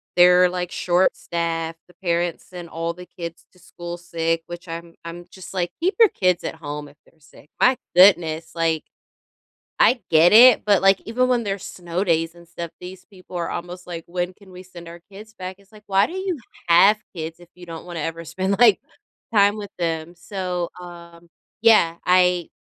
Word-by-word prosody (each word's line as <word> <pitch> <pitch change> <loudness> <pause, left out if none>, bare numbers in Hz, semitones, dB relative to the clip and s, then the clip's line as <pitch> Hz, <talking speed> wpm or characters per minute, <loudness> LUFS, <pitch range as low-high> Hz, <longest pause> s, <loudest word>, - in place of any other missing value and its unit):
they're, 180 0 +6
like, 180 -1 -4
short-staffed. 170 -2 -1
The 180 - -21
parents 170 -1 -1
sent 175 -2 -9
all 165 +1 -3
the 180 +1 -12
kids 170 -2 -9
to 180 - -23
school 175 0 -8
sick, 165 -1 -2
which 175 +1 -9
I'm 165 0 -8
I'm 170 +1 -8
just, 190 0 -11
like, 175 -2 -2
"Keep 370 +3 +1
your 450 - +7
kids 180 - 0
at - - -4
home 150 -2 -7
if 145 - -22
they're 165 - -27
sick." 145 0 -19
My 255 0 +5 0.2
goodness, 170 -4 +4
like 165 -2 0 1.0
I 245 -1 +4
get 165 +3 +5
it, 245 +2 +8
but, 205 -3 +3
like, 195 0 +4
even 250 +3 0
when 245 -2 +1
there's 195 -2 -4
snow 175 +1 -4
days 165 -2 0
and 170 - -16
stuff, 170 -1 -7
these 180 +1 -10
people 185 -3 -11
are 170 - -3
almost 180 +1 -7
like, 170 -2 -6
"When 175 +1 -3
can 195 0 -19
we 180 0 -11
send 175 -2 -13
our 170 +1 -11
kids 215 +2 -12
back?" 185 -2 -8
It's 200 +1 -25
like, 210 -1 -17
"Why 195 +1 +3
do - - -9
you 375 -2 -3 0.3
have 195 +5 +6 0.2
kids 160 0 -6
if 175 -1 -17
you 180 0 -13
don't 165 0 -8
wanna 175 -2 -6
ever 165 +2 -5
spend, 190 +5 -2
like, 230 -5 +6 0.5
time 205 -1 +4
with 205 -1 -8
them?" 165 0 -3
So, 180 -1 -4
um 170 -1 -13 0.3
yeah, 215 -7 +5
I 180 -1 +3
175 Hz, 195 wpm, -22 LUFS, 170-190 Hz, 1.0 s, it